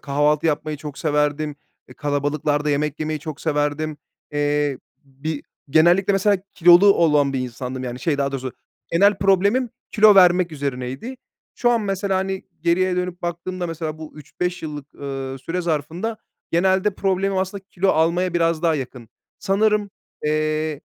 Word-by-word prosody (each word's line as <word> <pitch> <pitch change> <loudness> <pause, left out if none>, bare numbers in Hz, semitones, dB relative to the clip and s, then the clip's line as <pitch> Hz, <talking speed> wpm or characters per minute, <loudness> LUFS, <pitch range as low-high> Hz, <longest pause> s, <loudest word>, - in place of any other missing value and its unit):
kahvaltı 150 +2 +1
yapmayı 155 0 -1
çok 145 -1 -8
severdim, 150 -1 0 0.3
eee, - - -13
kalabalıklarda 145 +1 -1
yemek 150 +1 -1
yemeyi 155 0 -2
çok 155 0 -7
severdim. 150 0 -1 0.4
Eee, 145 -2 0 0.3
bir 140 +3 -5 0.3
genellikle 175 +6 +4
mesela 200 +1 +3 0.2
kilolu 175 +4 +7
olan 150 -4 +3
bir 135 - -1
insandım 125 +1 -5
yani, 125 0 -5
şey, 150 -4 0
daha 140 0 0
doğrusu, 130 -2 -4 0.4
genel 200 +3 +4
problemim 200 +6 +2 0.2
kilo 215 -1 +6
vermek 180 -2 +5
üzerineydi. 140 - -4 0.4
Şu 240 - +2
an 235 -1 +2
mesela, 195 -1 -1
hani, 190 0 -3 0.2
geriye 180 +2 +2
dönüp 180 -1 -3
baktığımda 175 +1 -3
mesela 160 -2 -5
bu 155 -1 -9
3-5 180 +4 -4
yıllık, 150 -2 -7
ııı, 135 -1 -5
süre 170 +7 -3
zarfında 170 +7 -2 0.3
genelde 190 +3 +2
problemim 195 0 0
aslında 190 +1 -3
kilo 190 0 -1
almaya 175 +2 +2
biraz 165 -1 +1
daha 165 -2 +3
yakın. 125 -4 -6 0.3
Sanırım, 210 +1 +1 0.3
eee, 155 0 0
160 Hz, 145 wpm, -22 LUFS, 145-185 Hz, 0.4 s, kilolu